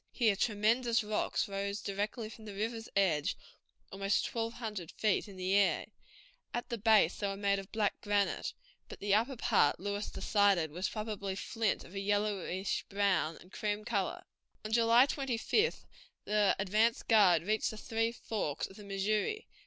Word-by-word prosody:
Here 225 Hz, -5 st, +2 dB
tremendous 230 Hz, +3 st, +2 dB
rocks 210 Hz, +1 st, -1 dB
rose 200 Hz, +1 st, -3 dB
directly 205 Hz, +3 st, -3 dB
from 220 Hz, 0 st, -12 dB
the 205 Hz, -2 st, -8 dB
river's 225 Hz, +2 st, -3 dB
edge 175 Hz, -7 st, +2 dB, 0.5 s
almost 195 Hz, +1 st, 0 dB
twelve 230 Hz, 0 st, -2 dB
hundred 210 Hz, -9 st, -6 dB
feet 215 Hz, 0 st, +1 dB
in 200 Hz, -, -11 dB
the 185 Hz, +1 st, -1 dB
air; 200 Hz, 0 st, +3 dB, 0.7 s
at 240 Hz, -, -3 dB
the 235 Hz, -2 st, -3 dB
base 215 Hz, -5 st, +4 dB
they 205 Hz, -, -1 dB
were 195 Hz, 0 st, -3 dB
made 200 Hz, 0 st, +1 dB
of 195 Hz, 0 st, -10 dB
black 215 Hz, -2 st, 0 dB
granite, 205 Hz, -1 st, 0 dB, 0.3 s
but -, -, -9 dB
the 200 Hz, 0 st, 0 dB
upper 235 Hz, +6 st, +2 dB
part 145 Hz, -9 st, +3 dB
Lewis 205 Hz, +2 st, -3 dB
decided 200 Hz, -7 st, +2 dB
was 180 Hz, +4 st, -2 dB
probably 210 Hz, -3 st, -4 dB
flint 220 Hz, +2 st, -1 dB
of 175 Hz, -, -14 dB
a 195 Hz, -, -3 dB
yellowish 200 Hz, -2 st, -1 dB
brown 195 Hz, -5 st, +1 dB
and 180 Hz, -, -17 dB
cream 210 Hz, 0 st, -2 dB
color. 235 Hz, -, -1 dB, 0.4 s
On 215 Hz, -, -4 dB
July 230 Hz, +2 st, +6 dB
25th 275 Hz, -, 0 dB, 0.4 s
the 210 Hz, -1 st, +3 dB
advance 215 Hz, +5 st, +2 dB
guard 190 Hz, -8 st, +5 dB
reached 215 Hz, +4 st, 0 dB
the 220 Hz, -, -7 dB
three 225 Hz, +1 st, -1 dB
forks 210 Hz, -10 st, -3 dB
of 190 Hz, -, -12 dB
the 210 Hz, -, -10 dB
Missouri. 210 Hz, -, -1 dB
205 Hz, 165 wpm, -32 LUFS, 195-225 Hz, 0.7 s, July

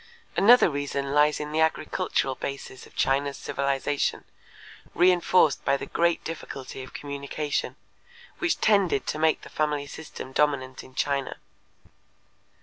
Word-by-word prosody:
Another 240 Hz, +5 st, +7 dB
reason 140 Hz, -2 st, -2 dB
lies 150 Hz, +1 st, +4 dB
in 150 Hz, 0 st, -5 dB
the 155 Hz, -, 0 dB
agricultural 155 Hz, -4 st, 0 dB
basis 135 Hz, -1 st, -7 dB
of -, -, -22 dB
China's 140 Hz, +1 st, +1 dB
civilization, 140 Hz, 0 st, -1 dB, 0.7 s
reenforced 180 Hz, -4 st, +4 dB
by 140 Hz, 0 st, +2 dB
the -, -, -6 dB
great 170 Hz, 0 st, +1 dB
difficulty 135 Hz, -5 st, -7 dB
of 130 Hz, -, -10 dB
communication, 140 Hz, +1 st, -3 dB, 0.6 s
which 355 Hz, -2 st, 0 dB
tended 200 Hz, -9 st, +3 dB
to 155 Hz, -, -3 dB
make 160 Hz, 0 st, +2 dB
the -, -, -12 dB
family 150 Hz, -2 st, -1 dB
system 145 Hz, -3 st, -9 dB
dominant 130 Hz, -2 st, 0 dB
in 130 Hz, -, -16 dB
China. 140 Hz, -1 st, -1 dB
145 Hz, 130 wpm, -26 LUFS, 140-160 Hz, 0.7 s, Another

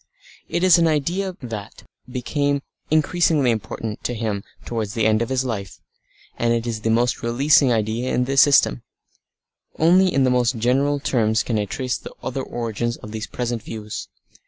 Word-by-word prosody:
It 175 Hz, -, -1 dB
was 180 Hz, -2 st, +6 dB
an 165 Hz, -, +4 dB
idea 175 Hz, +5 st, -1 dB
that 110 Hz, -4 st, -7 dB, 0.3 s
became 140 Hz, +3 st, -1 dB, 0.3 s
increasingly 155 Hz, -3 st, +3 dB
important 110 Hz, 0 st, -4 dB
to 120 Hz, -, -1 dB
him 105 Hz, -3 st, -2 dB, 0.2 s
towards 110 Hz, -2 st, -3 dB
the 115 Hz, -2 st, +1 dB
end 110 Hz, 0 st, +3 dB
of 115 Hz, -, -1 dB
his 130 Hz, 0 st, 0 dB
life. 100 Hz, -6 st, -5 dB, 0.6 s
And 120 Hz, 0 st, +2 dB
it 115 Hz, 0 st, -2 dB
is 115 Hz, -2 st, -3 dB
the 115 Hz, -, -1 dB
most 120 Hz, +2 st, +1 dB
releasing 135 Hz, +3 st, +3 dB
idea 115 Hz, +2 st, 0 dB
in 125 Hz, -, +1 dB
the 135 Hz, +2 st, -2 dB
system. 135 Hz, -, +5 dB, 1.0 s
Only 180 Hz, +3 st, +4 dB
in 135 Hz, -, +2 dB
the 130 Hz, -, +3 dB
most 125 Hz, -1 st, +2 dB
general 135 Hz, +5 st, +1 dB
terms 110 Hz, -5 st, +1 dB
can 115 Hz, -3 st, -1 dB
I 105 Hz, -, 0 dB
trace 125 Hz, +5 st, -3 dB
the -, -, -10 dB
other 135 Hz, +1 st, -3 dB
origins 120 Hz, -1 st, -3 dB
of 105 Hz, -, -10 dB
these 110 Hz, 0 st, -5 dB
present 120 Hz, -2 st, -3 dB
views. 105 Hz, -1 st, -7 dB
120 Hz, 175 wpm, -22 LUFS, 110-140 Hz, 1.0 s, was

